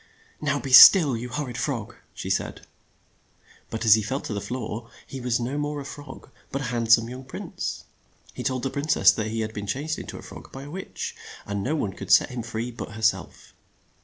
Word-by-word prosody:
"Now 145 -1 0
be 135 - -6
still, 140 +2 +10
you 120 +2 -5
hor 145 +4 -3
rid 120 -2 -6
frog," 120 -8 -3 0.2
she - - -4
said. - - -2 1.0
But 115 +1 -4
as 110 - +8
he 110 - +4
fell 130 +7 -2
to - - -5
the 100 - -3
floor, 120 -1 -5 0.2
he 135 - -8
was 125 -1 0
no 130 +5 -2
more 145 0 -2
a 140 - -7
frog, 145 -1 -10 0.2
but 135 - -2
a 135 - -4
hand 115 -1 0
some 115 0 +6
young 125 +2 -8
prince. 130 - -6 0.5
He - - -7
told 130 -2 -2
the 135 - -1
prin 140 +2 -3
cess - - +6
that 110 -1 -3
he 110 +1 -2
had 110 0 -4
been 105 -1 -6
changed 150 +7 -2
in - - -8
to - - -7
a - - -11
frog - - -12
by 135 - -8
a 145 - -10
witch, 190 +3 -6 0.3
and 100 -1 -3
no 145 +10 -1
one 105 -10 -2
could - - -9
set - - +5
him 125 -1 -4
free 115 +1 -4
but 115 -2 -8
her 110 - -8
self. 110 - -1
125 Hz, 235 wpm, -25 LUFS, 115-140 Hz, 1.0 s, still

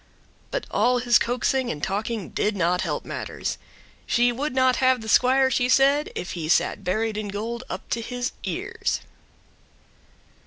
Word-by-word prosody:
But - - -3
all 250 0 +3
his 240 0 +4
coaxing 250 +1 0
and 145 - -5
talking 205 +1 -2
did 210 0 0
not 180 -1 +1
help - - -3
matters. - - -4 0.5
She 245 +1 +3
would 270 +3 -3
not 260 -1 +3
have 255 -2 +3
the 220 - -8
squire, 260 +3 +4
she 245 0 +1
said, 275 +3 +4
if - - -4
he 160 -3 -4
sat 200 - +2
buried 215 +4 -1
in 215 -1 -3
gold 225 +4 -4
up - - -6
to 235 - 0
his 245 +2 -3
ears. - - -2
240 Hz, 160 wpm, -24 LUFS, 210-255 Hz, 0.5 s, his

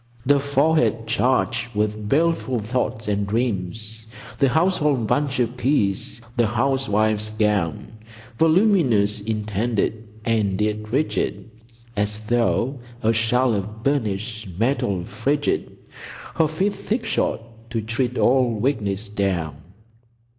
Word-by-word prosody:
"The 140 +1 +4
forehead 140 -5 +2
charged 120 0 0
with 105 0 -1
baleful 160 -3 +1
thoughts 110 0 -2
and 100 -1 0
dreams, 110 0 -3 0.3
The 135 -2 +4
household 150 -5 +2
bunch 140 +3 0
of 120 0 0
keys, 120 -5 0 0.2
the 120 -2 +3
housewife's 110 -3 +1
gown, 105 -1 -1 0.4
Voluminous 160 - +3
indented, 110 +1 -1 0.2
and 105 -4 +1
yet 105 0 -1
rigid 135 -4 -1 0.4
As 105 0 -1
though 115 +3 0 0.2
a 110 +1 +3
shell 115 +3 +2
of 105 +2 -4
burnished 110 -5 -1
metal 100 -6 0
frigid, 145 +9 -1 0.6
Her 160 -1 +2
feet 190 +7 0
thick 225 +4 -3
shod - - 0 0.3
to 120 -1 -2
tread 115 +3 -2
all 125 -2 +3
weakness 105 -4 -1
down." 95 -7 -1
115 Hz, 110 wpm, -22 LUFS, 105-135 Hz, 0.6 s, The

